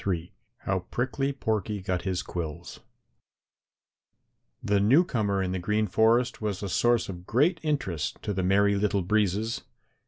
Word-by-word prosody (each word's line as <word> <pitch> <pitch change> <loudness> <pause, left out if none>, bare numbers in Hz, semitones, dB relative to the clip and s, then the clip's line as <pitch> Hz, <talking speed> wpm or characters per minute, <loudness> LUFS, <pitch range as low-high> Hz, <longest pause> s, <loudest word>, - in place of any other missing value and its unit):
III 85 -3 -2 0.3
HOW 95 -1 0
PRICKLY 130 +3 -1
PORKY 110 -5 -2
GOT 90 -2 -2
HIS 95 -2 -2
QUILLS 85 0 -6 1.8
The 100 0 +2
newcomer 105 - +3
in 90 - -2
the 95 - -2
Green 105 +4 0
Forest 115 +5 +2
was 105 -2 -3
a 100 - -3
source 120 +5 +2
of 90 -2 -8
great 155 - +2
interest 115 - -2
to 105 - -2
the 95 - -1
Merry 100 +2 +3
Little 100 -1 +1
Breezes. 105 +3 0
100 Hz, 145 wpm, -27 LUFS, 95-115 Hz, 1.8 s, newcomer